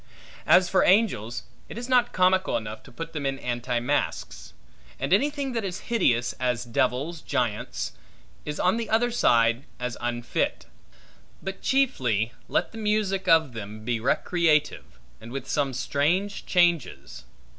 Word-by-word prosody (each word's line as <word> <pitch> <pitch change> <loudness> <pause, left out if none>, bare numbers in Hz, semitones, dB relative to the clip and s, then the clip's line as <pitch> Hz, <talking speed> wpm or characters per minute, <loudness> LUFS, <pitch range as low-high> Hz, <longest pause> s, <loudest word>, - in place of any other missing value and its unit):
As 180 0 +6
for 190 - +3
angels, 180 - +2 0.3
it - - -8
is 240 +1 -5
not 250 -2 +3
comical 185 +1 +2
enough, 110 -1 -6
to - - -16
put 165 0 -7
them 150 -3 -4
in 135 0 -1
anti 120 -1 -2
masques; 120 - -2 0.5
and - - 0
anything 280 +4 +1
that 230 -3 -2
is 190 -1 -4
hideous, 120 - +2
as 125 -1 -1
devils, 130 +7 -1
giants, 120 -6 -2 0.5
is 150 0 -5
on 185 +5 +2
the 230 - -3
other 240 +2 +2
side 115 - +3 0.2
as 125 -1 -4
unfit. 120 0 -2 0.8
But 195 0 -5
chiefly, 125 - +1 0.2
let - - 0
the 225 - -8
music 210 -3 0
of 160 -7 +4
them 110 0 -8
be 120 -1 0
recreative, 155 +5 +1 0.2
and 115 +1 -10
with 135 0 -5
some 140 -1 0
strange 165 +10 -1
changes. 170 - +1
150 Hz, 145 wpm, -26 LUFS, 120-195 Hz, 0.8 s, As